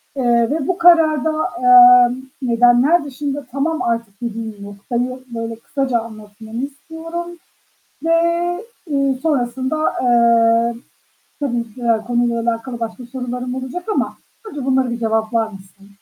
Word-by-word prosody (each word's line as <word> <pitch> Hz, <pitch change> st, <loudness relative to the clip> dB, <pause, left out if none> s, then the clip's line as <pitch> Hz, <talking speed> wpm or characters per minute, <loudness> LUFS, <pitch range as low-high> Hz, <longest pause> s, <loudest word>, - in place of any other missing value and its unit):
eee, 240 Hz, -3 st, +2 dB
ve 300 Hz, -2 st, -2 dB
bu 370 Hz, -, 0 dB
kararda, 320 Hz, -3 st, +4 dB, 0.3 s
eee, 245 Hz, 0 st, +7 dB, 0.3 s
nedenler 245 Hz, +6 st, +4 dB
dışında 285 Hz, +1 st, -5 dB
tamam 310 Hz, +5 st, -1 dB
artık 230 Hz, -3 st, -3 dB
dediğin 225 Hz, -2 st, -5 dB
noktayı 240 Hz, +6 st, -4 dB, 0.2 s
böyle 230 Hz, 0 st, -4 dB
kısaca 260 Hz, +1 st, -2 dB
anlatmamı 220 Hz, +1 st, -8 dB
istiyorum 325 Hz, +4 st, -7 dB, 0.8 s
ve, 330 Hz, 0 st, +3 dB, 0.7 s
eee, 275 Hz, -3 st, 0 dB
sonrasında, 260 Hz, -2 st, -1 dB, 0.2 s
eee, 235 Hz, -1 st, +3 dB, 0.6 s
tabii 240 Hz, -6 st, -3 dB
ki -, -, -13 dB
ya, 230 Hz, -2 st, +1 dB
konuyla 240 Hz, -1 st, 0 dB
alakalı 235 Hz, +1 st, -3 dB
başka 230 Hz, +2 st, -5 dB
sorularım 250 Hz, 0 st, -5 dB
olacak 260 Hz, +7 st, -5 dB
ama -, -, -2 dB, 0.3 s
önce 285 Hz, -9 st, -6 dB
bunları 265 Hz, -2 st, +1 dB
bir 235 Hz, -, -4 dB
cevaplar 220 Hz, 0 st, 0 dB
mısın? 195 Hz, -1 st, -15 dB
245 Hz, 125 wpm, -19 LUFS, 230-275 Hz, 0.8 s, eee